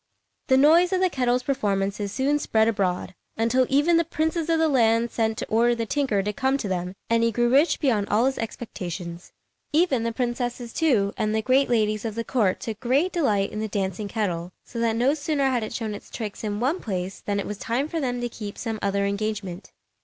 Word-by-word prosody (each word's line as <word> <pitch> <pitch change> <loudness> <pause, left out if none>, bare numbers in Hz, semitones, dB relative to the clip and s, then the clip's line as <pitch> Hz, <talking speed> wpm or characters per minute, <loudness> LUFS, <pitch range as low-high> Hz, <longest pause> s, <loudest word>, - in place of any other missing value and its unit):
The 260 -3 +5
noise 325 +6 +5
of 375 - +2
the 370 -1 +2
kettle's 250 -2 +1
performances 200 -6 -1
soon 280 +5 +1
spread 220 -5 +2
abroad, 190 -4 -1 0.2
until 235 +3 +2
even 295 +5 +4
the 335 - +3
princes 320 0 -1
of 330 - +3
the 320 0 +3
land 230 -4 +3
sent 220 -1 0
to - - -3
order 235 +2 +3
the 230 -1 -2
tinker 225 -6 0
to 210 +1 -2
come 265 +1 +1
to 230 - -4
them; 180 0 -3
and 230 0 +2
he 230 0 +2
grew 240 +2 +1
rich 285 +6 +4
beyond 225 -9 +1
all 225 +4 +3
his 265 0 0
expectations. 180 -6 -6 0.4
Even 300 -6 +2
the 230 0 -1
princesses, 240 0 -3
too, 230 -12 +2
and 215 0 0
the 220 - 0
great 265 +3 +3
ladies 215 -3 +1
of 220 -2 -4
the 230 - -2
court, 215 -6 +1
took 220 -2 -5
great 270 +9 +1
delight 210 - +1
in 215 - -5
the 220 - -2
dancing 195 0 -2
kettle, 180 -5 -2
so 235 - -7
that 230 -1 +1
no 250 +5 +3
sooner 295 -2 -1
had 245 -2 +1
it 215 - -5
shown 220 -3 -3
its 205 - -10
tricks 215 -3 -6
in 205 -1 -2
one 275 +10 0
place 190 -3 -4
than 200 -1 -2
it - - -3
was 210 - -5
time 250 +5 -1
for 325 +1 -3
them 245 -4 -2
to 240 - -1
keep 210 -3 -8
some 225 -2 -4
other 200 0 0
engagement. 200 -2 -3
230 Hz, 220 wpm, -25 LUFS, 205-265 Hz, 0.4 s, The